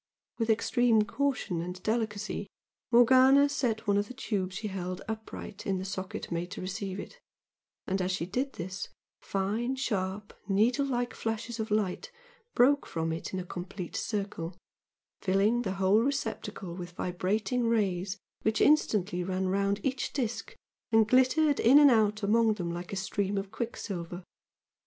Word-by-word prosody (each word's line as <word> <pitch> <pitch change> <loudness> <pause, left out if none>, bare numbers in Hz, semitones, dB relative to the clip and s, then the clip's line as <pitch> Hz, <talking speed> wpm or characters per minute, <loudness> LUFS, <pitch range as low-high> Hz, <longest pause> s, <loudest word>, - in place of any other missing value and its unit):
With 225 0 0
extreme 225 0 +3
caution 215 -6 -1
and 180 +2 -6
delicacy 215 -2 -2 0.4
Morgana 260 +4 +7
set 245 -6 -1
one 200 -1 +3
of 205 0 0
the 255 - -9
tubes 190 -7 -2
she 215 +1 -3
held 185 -1 -4
upright 220 -2 -6
in 195 -1 +1
the 185 - -4
socket 190 -2 -5
made 170 +1 -2
to 200 - -7
receive 195 +1 -4
it, 485 - -9 0.7
and 190 0 -1
as 185 +1 0
she 185 -3 -1
did 255 +9 -2
this, 185 +3 -5 0.3
fine 215 +7 -1
sharp, 205 -6 -2
needle 235 +8 +2
like 245 -2 -1
flashes 225 +1 -4
of 220 +1 -2
light 210 - -1 0.4
broke 280 +3 +4
from 165 0 -2
it 165 - -5
in 190 - -2
a 180 - -5
complete 180 0 -6
circle, 195 -5 -3 0.6
filling 200 +5 +2
the 190 -5 -2
whole 195 +3 +3
receptacle 225 -8 -3
with 175 -1 -7
vibrating 210 +8 -1
rays 195 -4 0 0.2
which 220 0 +1
instantly 210 - +3
ran 185 +1 -1
round 200 +1 +1
each 265 -1 -1
disc, 240 -4 -3 0.4
and 220 -1 +5
glittered 260 +5 +4
in 255 +5 +7
and 290 -2 +8
out 215 -2 +2
among 220 +1 +3
them 175 -4 -3
like 175 +1 -6
a - - -3
stream 195 +1 -1
of 195 0 -3
quicksilver. 185 -7 -5
210 Hz, 155 wpm, -30 LUFS, 185-235 Hz, 0.7 s, and